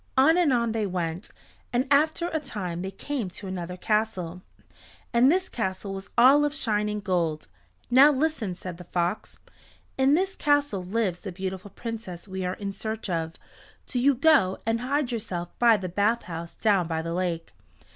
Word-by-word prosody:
On 295 +5 +6
and 350 -5 +3
on 235 -2 +2
they 220 -2 -1
went, 175 +1 -3 0.4
and 250 +1 +1
after 315 +4 +3
a 320 - -1
time 185 - -5
they 190 - -3
came 230 +2 -4
to 190 +3 -10
another 180 -1 -5
castle, 185 -4 -1 0.7
and 245 +4 +6
this 370 +2 +1
castle 195 -3 -3
was 195 +1 -7
all 270 +5 +7
of 295 0 0
shining 210 -5 0
gold. 170 -6 -1 0.4
"Now 270 +4 +8
listen," 270 - -1
said 180 -1 -7
the 180 - -11
fox. 175 +4 -2 0.6
"In 270 +2 +5
this 380 +3 0
castle 290 -10 +1
lives 190 -2 -1
the 195 - -6
beautiful 190 +2 -5
Princess 215 -6 -7
we 190 -1 -4
are 180 +1 -2
in 200 -1 -4
search 220 0 -4
of. 165 -1 -2 0.5
Do 250 - -2
you 275 +2 +4
go 270 -9 +4
and 225 +1 +1
hide 270 0 0
yourself 185 -7 -3
by 235 -2 +6
the 185 -2 -4
bathhouse 180 -3 -1
down 200 -6 +2
by 160 -1 -2
the 165 0 -3
lake. 170 -2 -2
210 Hz, 175 wpm, -26 LUFS, 180-255 Hz, 0.7 s, Now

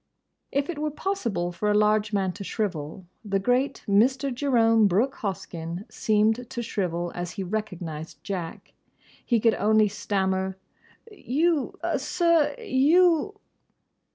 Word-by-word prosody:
If 280 +1 0
it 335 -4 -5
were 305 0 -1
possible 235 - -2
for 195 +5 -2
a 210 - +3
large 210 0 +2
man 195 -3 0
to 200 - -8
shrivel, 185 -4 -4 0.2
the 200 -2 0
great 250 +7 0
Mr. 260 +7 +2
Jerome 230 -5 +3
Brooke 230 +9 +1
Hoskyn 175 -2 -5
seemed 220 +3 +1
to 240 -2 -4
shrivel 175 -6 -2
as 175 0 -5
he 195 - -4
recognised 170 -6 -5
Jack. 180 -5 -6 0.5
He 235 -2 +2
could 225 +1 +3
only 215 0 +3
stammer, 190 -1 -1 0.5
"You, 315 - 0 0.2
sir—you! 335 - +2
215 Hz, 125 wpm, -26 LUFS, 190-270 Hz, 0.5 s, a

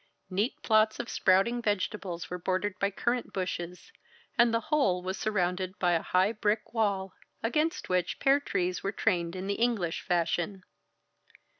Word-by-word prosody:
Neat 205 +7 0
plots 215 -1 +3
of 240 - -4
sprouting 195 +6 +3
vegetables 200 -4 -2
were 180 - -5
bordered 185 +3 -1
by 200 - +2
currant 240 +5 -1
bushes, 180 -2 -4 0.4
and 240 -1 +5
the 230 - +2
whole 190 -12 +3
was 190 +1 -2
surrounded 185 -2 -1
by 180 -1 +2
a 165 -2 +2
high 185 +3 +2
brick 210 0 -1
wall, 200 -4 0 0.3
against 305 +9 0
which 180 -1 0
pear 275 +1 +4
trees 185 -9 -1
were 195 - -1
trained 175 -5 0
in 185 +1 -4
the 200 - 0
English 210 -9 +1
fashion. 175 +2 -1
195 Hz, 155 wpm, -29 LUFS, 180-225 Hz, 0.4 s, and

